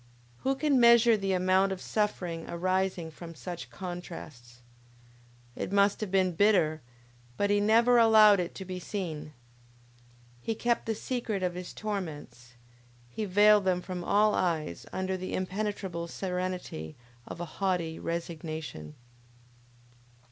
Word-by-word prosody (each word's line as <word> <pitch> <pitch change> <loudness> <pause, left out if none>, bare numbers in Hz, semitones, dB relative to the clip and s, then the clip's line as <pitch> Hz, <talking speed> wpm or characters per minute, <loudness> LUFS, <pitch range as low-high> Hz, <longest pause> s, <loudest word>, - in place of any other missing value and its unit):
Who 270 +1 0
can 280 -1 +2
measure 235 -1 +7
the 195 -2 -1
amount 185 +1 +3
of 190 - -3
suffering 180 -6 -2
arising 185 -1 -1
from 165 +1 -10
such 165 +6 -7
contrasts? 160 -10 -9 0.9
It - - -4
must 200 +1 +3
have 215 - -2
been 190 -1 +2
bitter, 170 -5 +3 0.6
but 205 0 +1
he 205 - +3
never 230 +4 +5
allowed 215 -3 +7
it 175 -1 -3
to 190 - -7
be 185 0 -5
seen! 165 -6 -5 1.1
He 225 - -2
kept 235 +1 0
the 225 - 0
secret 220 -4 -3
of 180 -1 0
his 180 0 -7
torments, 145 - -6 0.5
he 215 - -4
veiled 205 +1 +5
them 185 -1 +2
from 180 -1 -6
all 210 +3 +3
eyes 160 - -1
under 190 0 -2
the 185 0 -4
impenetrable 185 -3 -3
serenity 180 - -4 0.3
of - - -8
a 175 - -3 0.2
haughty 175 -4 0
resignation. 160 - -5
185 Hz, 135 wpm, -29 LUFS, 170-210 Hz, 1.1 s, measure